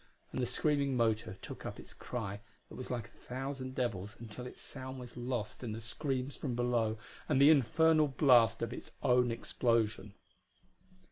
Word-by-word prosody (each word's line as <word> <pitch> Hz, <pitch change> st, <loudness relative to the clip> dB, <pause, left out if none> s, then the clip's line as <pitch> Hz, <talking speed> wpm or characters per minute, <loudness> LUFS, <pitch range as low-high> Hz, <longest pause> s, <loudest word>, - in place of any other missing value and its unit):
And 130 Hz, -, -2 dB
the 125 Hz, -, +1 dB
screaming 140 Hz, +1 st, +1 dB
motor 110 Hz, -4 st, +1 dB
took -, -, -8 dB
up -, -, -6 dB
its -, -, -10 dB
cry 100 Hz, -4 st, -5 dB, 0.3 s
that -, -, -10 dB
was 130 Hz, -, -7 dB
like 120 Hz, -2 st, -3 dB
a -, -, -25 dB
thousand 130 Hz, 0 st, -4 dB
devils 110 Hz, -4 st, -2 dB
until 120 Hz, +2 st, -7 dB
its -, -, -11 dB
sound 130 Hz, -1 st, -6 dB
was 125 Hz, -1 st, -9 dB
lost 120 Hz, -2 st, -3 dB
in 110 Hz, -3 st, -3 dB
the 110 Hz, -, -5 dB
screams 130 Hz, +4 st, -2 dB
from 130 Hz, -5 st, -3 dB
below 120 Hz, -2 st, +1 dB, 0.3 s
and 140 Hz, -3 st, +3 dB
the 140 Hz, +3 st, +9 dB
infernal 155 Hz, +2 st, +4 dB
blast 125 Hz, -5 st, +5 dB
of -, -, -2 dB
its -, -, -9 dB
own 125 Hz, 0 st, +4 dB
explosion. 115 Hz, -3 st, 0 dB
125 Hz, 175 wpm, -34 LUFS, 115-135 Hz, 0.3 s, the